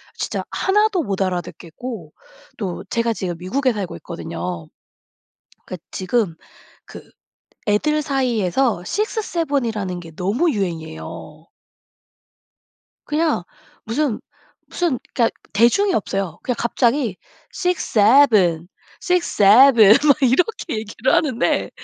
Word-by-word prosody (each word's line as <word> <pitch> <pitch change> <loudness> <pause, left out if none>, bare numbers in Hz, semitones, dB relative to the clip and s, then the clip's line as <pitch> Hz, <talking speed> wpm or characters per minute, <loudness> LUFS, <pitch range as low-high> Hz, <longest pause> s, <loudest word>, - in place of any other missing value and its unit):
진짜 - - -4
하나도 405 -3 +1
못 195 -3 -3
알아듣겠고 180 +1 -5 0.4
또 190 -5 -5
제가 230 0 0
지금 185 -6 -3
미국에 250 +8 0
살고 195 - -5
있거든요. 85 -1 -6 1.0
그 185 - -6
지금 190 -2 -1 0.5
그 - - -13 0.6
애들 300 +9 +1
사이에서 245 - 0
6-7 340 - -1
이라는 200 -6 -3
게 165 -2 -11
너무 220 - 0
유행이에요. 160 - -6 1.6
그냥 300 - 0 0.4
무슨 245 +1 -1 0.5
무슨 340 -8 -1 0.2
그러니까 230 -2 +2 0.2
대중이 240 - +3
없어요. 195 - -2
그냥 250 - -1
갑자기 235 -3 0 0.4
6-7, 215 - +3 0.3
6-7 235 - +6
막 280 - +6
이렇게 315 - +1
얘기를 225 +4 -2
하는데 265 -6 +1
225 Hz, 210 characters per minute, -20 LUFS, 185-280 Hz, 1.6 s, 6-7